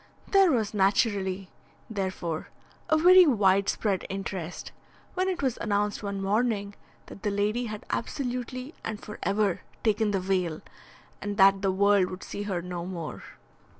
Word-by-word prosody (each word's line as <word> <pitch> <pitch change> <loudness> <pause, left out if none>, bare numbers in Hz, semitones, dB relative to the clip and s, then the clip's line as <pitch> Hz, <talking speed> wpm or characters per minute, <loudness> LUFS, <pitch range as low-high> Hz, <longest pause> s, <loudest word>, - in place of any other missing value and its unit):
There 390 -3 +5
was 220 -6 0
naturally, 195 -2 +1 0.4
therefore, 185 -6 -3 0.4
a 315 - +4
very 360 +2 +8
widespread 200 -3 +2
interest 190 -3 -5 0.4
when 370 +1 0
it 365 -5 -2
was 260 -3 0
announced 205 -1 0
one 200 -1 -3
morning 205 0 0 0.3
that - - -12
the 210 - 0
lady 210 +4 0
had 215 -1 -7
absolutely 255 +2 -3
and 215 -2 -4
for 210 -2 -9
ever 200 -1 +1 0.2
taken 215 -1 +2
the 200 -2 +1
veil, 185 -4 -1 0.6
and 205 -1 -4
that 195 0 +6
the 195 -1 +2
world 200 -1 +3
would 185 - -7
see 205 - -6
her 175 -3 -2
no 180 -1 -5
more. 170 -4 -6
205 Hz, 150 wpm, -27 LUFS, 190-225 Hz, 0.6 s, very